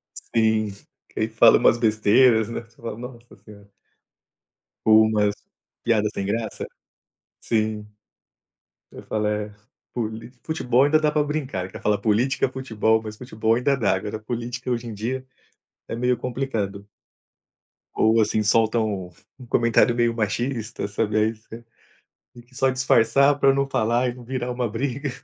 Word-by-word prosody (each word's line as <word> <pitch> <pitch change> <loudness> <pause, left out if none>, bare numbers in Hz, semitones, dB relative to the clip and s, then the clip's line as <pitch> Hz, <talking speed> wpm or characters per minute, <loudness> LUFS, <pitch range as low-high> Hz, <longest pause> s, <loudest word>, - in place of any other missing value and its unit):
Sim, 110 -1 0 0.5
e 110 - 0
fala 110 0 +6
umas 120 - +4
besteiras, 110 +1 +4
né. 115 - -4
Você 115 0 -25
fala: 115 -1 -7
"Nossa 120 -1 -11
senhora". 100 -1 -16 1.2
Ou 110 0 +7
umas 105 -2 +1 0.5
piadas 110 -2 +2
sem 100 - -3
graça. 110 +2 -3 0.8
Sim. 110 -1 -1 1.0
Eu - - -11
falo: 105 -1 -2
"É, 105 0 -2 0.4
poli 115 0 -5
futebol 130 -5 +2
ainda 155 +2 +3
dá 150 -1 +2
pra 150 0 +1
brincar, 145 -10 -3
ele 95 - -10
quer - - -9
falar 105 -1 +1
política, 110 +7 +1
futebol," 110 -4 0
mas 110 -1 -8
futebol 110 -2 -1
ainda 130 +4 +1
dá. 115 -6 +1
Agora, 105 +3 -5
política 120 +3 -5
hoje 120 -1 -2
em 115 - -6
dia 130 +5 -4 0.6
é - - -4
meio 125 +1 +1
complicado. 115 -6 -4 1.1
Ou 110 +1 +4
assim, 110 0 +1
solta 110 +2 +2
um 100 -5 -2 0.3
um 125 - -12
comentário 115 0 +3
meio 120 -1 +2
machista, 115 0 -2
sabe, 105 +1 0
isso, 110 0 -15 1.0
que 130 - -26
só 135 0 +2
disfarçar, 135 +2 +3
pra 135 - +5
não 140 0 0
falar 120 0 +1
e 120 - -4
não 125 - -12
virar 125 0 -3
uma 125 -1 -2
briga. 135 +5 -3
115 Hz, 150 wpm, -23 LUFS, 110-125 Hz, 1.2 s, Ou